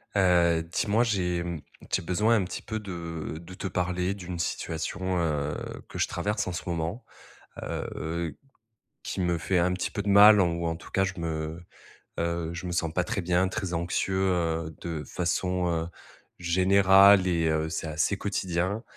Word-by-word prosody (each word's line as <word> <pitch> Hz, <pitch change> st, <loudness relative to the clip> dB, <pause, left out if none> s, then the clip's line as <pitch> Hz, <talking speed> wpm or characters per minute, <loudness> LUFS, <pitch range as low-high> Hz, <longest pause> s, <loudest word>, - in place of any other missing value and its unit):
Heu, 85 Hz, -3 st, +4 dB
dis-moi, 105 Hz, +6 st, +2 dB
j'ai 90 Hz, -6 st, 0 dB, 0.5 s
j'ai -, -, +1 dB
besoin 105 Hz, +7 st, +2 dB
un 105 Hz, -, +2 dB
petit 90 Hz, -, -5 dB
peu 110 Hz, -, -4 dB
de 85 Hz, -6 st, -6 dB
de 85 Hz, +2 st, -11 dB
te 95 Hz, -, -4 dB
parler 90 Hz, +1 st, -1 dB
d'une 90 Hz, -3 st, -6 dB
situation, 90 Hz, +3 st, -2 dB
heu, 75 Hz, -3 st, -1 dB, 0.3 s
que -, -, -8 dB
je -, -, +2 dB
traverse 105 Hz, 0 st, -2 dB
en -, -, -2 dB
ce -, -, -4 dB
moment. 85 Hz, +7 st, -3 dB, 0.6 s
Heu, -, -, -4 dB
heu, 85 Hz, +1 st, -3 dB, 0.7 s
qui -, -, -3 dB
me 90 Hz, -1 st, +1 dB
fait 90 Hz, +3 st, +1 dB
un 90 Hz, +1 st, +2 dB
petit 90 Hz, -, -2 dB
peu 105 Hz, -, -2 dB
de 100 Hz, -, -3 dB
mal 105 Hz, +1 st, +8 dB
ou 85 Hz, -1 st, 0 dB
en 80 Hz, 0 st, -1 dB
tout -, -, -13 dB
cas, 95 Hz, -, +2 dB
je 95 Hz, -1 st, -1 dB
me, 80 Hz, 0 st, -3 dB, 0.6 s
heu, 85 Hz, -1 st, -1 dB
je 85 Hz, +2 st, -6 dB
me -, -, -3 dB
sens 80 Hz, -2 st, -1 dB
pas 90 Hz, -, +1 dB
très 100 Hz, -, -2 dB
bien, 90 Hz, +1 st, +2 dB
très 95 Hz, -1 st, -3 dB
anxieux, 85 Hz, +3 st, -1 dB
heu, 85 Hz, -4 st, 0 dB
de 80 Hz, -3 st, -4 dB
façon, 90 Hz, +1 st, -1 dB
heu, 80 Hz, -1 st, -1 dB, 0.5 s
générale 95 Hz, +2 st, +6 dB
et 85 Hz, -2 st, +1 dB
heu, 80 Hz, 0 st, 0 dB
c'est 80 Hz, 0 st, -3 dB
assez 80 Hz, +6 st, 0 dB
quotidien. 95 Hz, +1 st, -1 dB
90 Hz, 175 wpm, -27 LUFS, 85-95 Hz, 0.7 s, mal